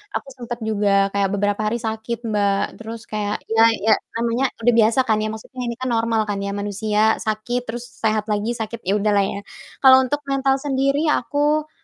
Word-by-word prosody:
aku -, -, -3 dB
sempat 240 Hz, -1 st, -6 dB
juga 200 Hz, -2 st, +2 dB
kayak 200 Hz, -1 st, +1 dB
beberapa 205 Hz, +1 st, 0 dB
hari 225 Hz, +3 st, 0 dB
sakit, 225 Hz, +1 st, -4 dB
Mbak. 205 Hz, -1 st, 0 dB
Terus 225 Hz, 0 st, -7 dB
kayak 210 Hz, -1 st, -3 dB
ya 225 Hz, 0 st, +5 dB, 0.2 s
ya 220 Hz, -, +6 dB, 0.2 s
namanya 235 Hz, +3 st, 0 dB, 0.2 s
udah 245 Hz, -, +5 dB
biasa 225 Hz, +3 st, +4 dB
kan 220 Hz, -3 st, +2 dB
ya, 215 Hz, -, -1 dB
maksudnya 220 Hz, +4 st, -8 dB
ini 235 Hz, -, -3 dB
kan 255 Hz, 0 st, -3 dB
normal 225 Hz, -1 st, +1 dB
kan 205 Hz, -, -1 dB
ya, 200 Hz, -, -3 dB
manusia 205 Hz, +1 st, -1 dB, 0.2 s
sakit, 220 Hz, +3 st, -2 dB
terus 240 Hz, +1 st, -5 dB, 0.2 s
sehat 215 Hz, -1 st, +1 dB
lagi, 210 Hz, +2 st, -1 dB
sakit, 225 Hz, +1 st, -5 dB
ya 195 Hz, +3 st, 0 dB
udahlah 205 Hz, -1 st, +2 dB
ya. -, -, -5 dB, 0.5 s
Kalau 260 Hz, 0 st, +8 dB
untuk 285 Hz, +3 st, -1 dB
mental 270 Hz, -1 st, +1 dB
sendiri 275 Hz, +2 st, 0 dB
aku 295 Hz, +5 st, 0 dB
225 Hz, 190 wpm, -21 LUFS, 210-250 Hz, 0.5 s, Kalau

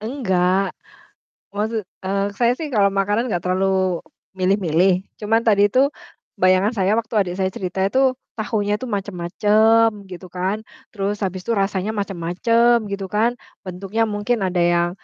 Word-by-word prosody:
Enggak, 195 Hz, -6 st, 0 dB, 0.7 s
maksud 215 Hz, +2 st, -2 dB, 0.2 s
eee, 195 Hz, +1 st, 0 dB
saya 240 Hz, 0 st, +3 dB
sih 305 Hz, +4 st, -5 dB
kalau 200 Hz, -6 st, +2 dB
makanan 205 Hz, +4 st, 0 dB
nggak 175 Hz, -, 0 dB
terlalu 185 Hz, 0 st, 0 dB, 0.3 s
milih-milih. 185 Hz, -1 st, +2 dB, 0.2 s
Cuman, 225 Hz, +2 st, +1 dB
tadi 205 Hz, -3 st, +3 dB
itu 265 Hz, +2 st, +4 dB, 0.5 s
bayangan 190 Hz, +4 st, +3 dB
saya 190 Hz, +1 st, +2 dB
waktu 225 Hz, +1 st, -1 dB
adik 185 Hz, -4 st, +1 dB
saya 190 Hz, -, +2 dB
cerita 190 Hz, 0 st, -5 dB
itu 260 Hz, +4 st, +3 dB, 0.2 s
tahunya 210 Hz, -2 st, -1 dB
itu 235 Hz, -, -8 dB
macem-macem, 210 Hz, +2 st, +2 dB, 0.2 s
gitu 185 Hz, -1 st, -10 dB
kan. 185 Hz, +4 st, -2 dB, 0.3 s
Terus, 200 Hz, 0 st, -2 dB
habis 185 Hz, 0 st, -3 dB
itu 225 Hz, +4 st, -2 dB
rasanya 195 Hz, +2 st, -1 dB
macem-macem, 210 Hz, +5 st, +1 dB
gitu 195 Hz, -1 st, -4 dB
kan. 220 Hz, +5 st, +1 dB, 0.3 s
Bentuknya 195 Hz, +4 st, -2 dB
mungkin 210 Hz, 0 st, -1 dB
ada 180 Hz, -1 st, 0 dB
yang 175 Hz, 0 st, +2 dB
200 Hz, 145 wpm, -21 LUFS, 185-220 Hz, 0.7 s, itu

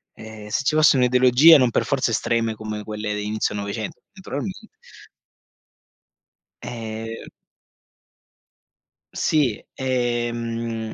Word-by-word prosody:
Ehm, 110 Hz, -1 st, -11 dB
se 120 Hz, -, -1 dB
ci 150 Hz, -, +1 dB
fosse 155 Hz, -2 st, +5 dB
un'ideologia, 125 Hz, +5 st, +6 dB
non 125 Hz, -2 st, +3 dB
per -, -, 0 dB
forza 135 Hz, -3 st, 0 dB
estreme 115 Hz, 0 st, 0 dB
come 105 Hz, -1 st, -6 dB
quelle 105 Hz, 0 st, -4 dB
di 105 Hz, 0 st, -4 dB
inizio 110 Hz, 0 st, -1 dB
'900, 100 Hz, +1 st, -5 dB
naturalmente 190 Hz, +3 st, -6 dB, 2.0 s
Ehm 115 Hz, -1 st, -7 dB, 1.9 s
Sì, 140 Hz, -9 st, 0 dB
ehm, 120 Hz, -3 st, -2 dB
115 Hz, 100 wpm, -22 LUFS, 110-130 Hz, 2.0 s, un'ideologia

